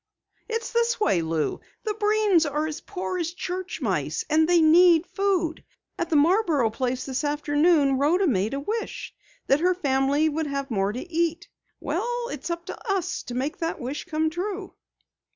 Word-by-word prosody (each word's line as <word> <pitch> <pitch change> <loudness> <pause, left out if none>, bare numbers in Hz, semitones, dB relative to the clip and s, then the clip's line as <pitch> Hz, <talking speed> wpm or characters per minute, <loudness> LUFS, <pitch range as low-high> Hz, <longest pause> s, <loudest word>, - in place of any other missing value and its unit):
"It's 455 0 -3
this 470 0 +1
way, 195 - +2
Lou. 160 -1 -1 0.2
The 430 - -1
Breens 415 -7 +2
are 300 +2 0
as 310 -1 -5
poor 370 -1 -4
as 340 0 -2
church 365 +1 -5
mice, - - -1
and 315 +1 +4
they 350 -1 +5
need 335 +1 +6
food. 370 -5 -1 0.4
At 340 - -1
the 320 - +1
Marborough 305 - +3
place 255 +2 -2
this 265 +1 -3
afternoon 290 -1 +2
Rhoda 340 +7 +3
made 220 - +1
a - - -2
wish 435 +10 -4 0.3
that 275 - +3
her 360 +2 +2
family 280 -1 +2
would 310 0 -1
have 275 -1 -4
more 195 -2 +1
to 250 +11 -6
eat. 335 0 -1 0.3
Well, 485 0 -2
it's - - -6
up 340 0 -4
to 405 - -5
us 385 -4 -1
to 245 - -6
make 285 +8 -2
that 330 0 -2
wish 265 +5 -5
come 315 -2 0
true." 375 +3 -4
320 Hz, 175 wpm, -25 LUFS, 280-370 Hz, 0.4 s, need